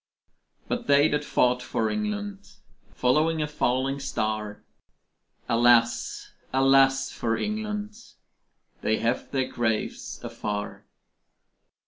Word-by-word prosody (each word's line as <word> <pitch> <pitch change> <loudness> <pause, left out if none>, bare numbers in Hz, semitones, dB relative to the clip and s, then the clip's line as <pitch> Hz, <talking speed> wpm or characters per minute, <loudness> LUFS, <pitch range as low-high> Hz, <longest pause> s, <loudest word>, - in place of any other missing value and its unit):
But - - -3
they 145 +1 +5
that 150 0 0
fought 125 -3 +2
for 115 -2 -1
England, 205 - -4 0.4
Following 155 +6 +2
a 150 - +1
falling 135 -1 0
star, 110 -6 -3 0.8
Alas, 120 0 +2 0.2
alas 135 0 +4
for 115 -1 -1
England 210 - -3 0.9
They 110 - +1
have 120 +2 -1
their 130 -2 0
graves 110 -2 -2
afar. 105 -1 -5
135 Hz, 95 wpm, -26 LUFS, 115-155 Hz, 0.9 s, they